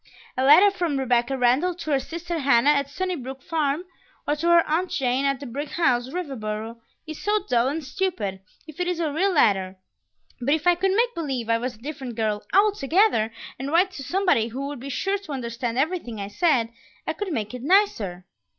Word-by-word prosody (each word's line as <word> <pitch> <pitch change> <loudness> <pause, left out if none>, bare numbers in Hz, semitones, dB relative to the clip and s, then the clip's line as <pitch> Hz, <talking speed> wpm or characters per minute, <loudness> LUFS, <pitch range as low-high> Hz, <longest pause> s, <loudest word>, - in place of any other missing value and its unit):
"A 260 - 0
letter 330 +9 +7
from 345 -7 -1
Rebecca 255 0 +1
Randall 260 +9 +2
to 330 -3 -5
her 275 - +3
sister 335 +3 -5
Hannah 275 -1 +4
at 280 -2 +1
Sunnybrook 280 -7 -4
Farm, 315 -2 -1 0.4
or 295 - +2
to 330 +3 -1
her 340 -1 +5
aunt 345 +4 0
Jane 260 0 0
at 275 -2 +1
the 285 - -8
brick 280 +4 -5
house, 250 -7 +1
Riverboro, 230 -9 -5 0.3
is 315 -1 -8
so 420 0 +1
dull 240 0 +2
and 305 +3 -2
stupid, 265 - -3 0.2
if 310 0 -13
it 360 - 0
is 360 -2 -1
a 315 -4 -1
real 380 +6 +2
letter; 195 - +2 0.6
but 280 +5 +2
if 315 - -5
I 355 - +6
could 375 +3 0
make 475 +3 +2
believe 265 - -3
I 230 0 +3
was 250 +1 -4
a 220 - -21
different 270 -5 -6
girl 215 -2 -1
altogether, 390 - +3 0.3
and 270 +2 -4
write 360 +5 +3
to 295 - -8
somebody 355 - +1
who 260 +4 -5
would 290 - -6
be 270 +3 -7
sure 390 +9 -1
to 330 -7 -8
understand 235 -2 -3
everything 270 - -1
I 200 0 -5
said, 255 - +2 0.4
I - - -1
could 410 -3 -4
make 215 -6 -3
it 250 - -6
nicer." 240 - +1
280 Hz, 205 wpm, -24 LUFS, 240-345 Hz, 0.6 s, letter